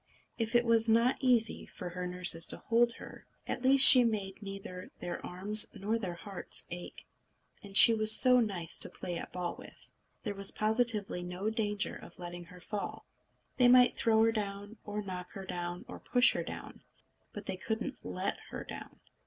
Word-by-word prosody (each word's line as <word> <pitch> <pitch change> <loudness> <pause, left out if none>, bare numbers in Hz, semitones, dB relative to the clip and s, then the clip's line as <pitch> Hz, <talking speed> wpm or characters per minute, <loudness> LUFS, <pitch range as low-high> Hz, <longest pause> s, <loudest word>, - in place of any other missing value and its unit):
If 225 +1 -3
it 240 0 +3
was 230 -1 +2
not 230 +3 +2
easy 240 -4 0
for 180 - -9
her 180 +1 -6
nurses 180 -2 +1
to - - +3
hold 235 +1 0
her, - - -14 0.2
at - - -5
least 265 +1 +5
she 250 -2 +9
made 205 -4 -4
neither 195 -2 -9
their 175 - -7
arms 205 +4 +4
nor 215 +4 -3
their 185 -5 -6
hearts 195 +2 -5
ache. 175 0 -9 0.6
And 200 0 -5
she 230 - +8
was 215 -1 +6
so 250 -1 +5
nice 190 -8 -1
to - - +8
play 175 -1 -7
at - - -10
ball 180 -1 -5
with! - - -15 0.3
There 210 - -4
was 195 0 +3
positively 215 -4 -1
no 180 +4 -5
danger 210 -2 -2
of - - -14
letting 175 0 -9
her 180 +2 -16
fall. 205 +3 -7 0.5
They 250 - +4
might 250 0 +4
throw 220 -1 +1
her 225 - +2
down, 205 0 -6
or 210 0 -6
knock 180 -2 -9
her 195 -1 -9
down, 175 -1 -7
or - - -11
push 245 0 +2
her - - -4
down, - - -10 0.5
but - - -10
they - - -5
couldn't 220 +4 -5
let - - -5
her - - -8
down. - - -12
205 Hz, 185 wpm, -30 LUFS, 180-230 Hz, 0.6 s, she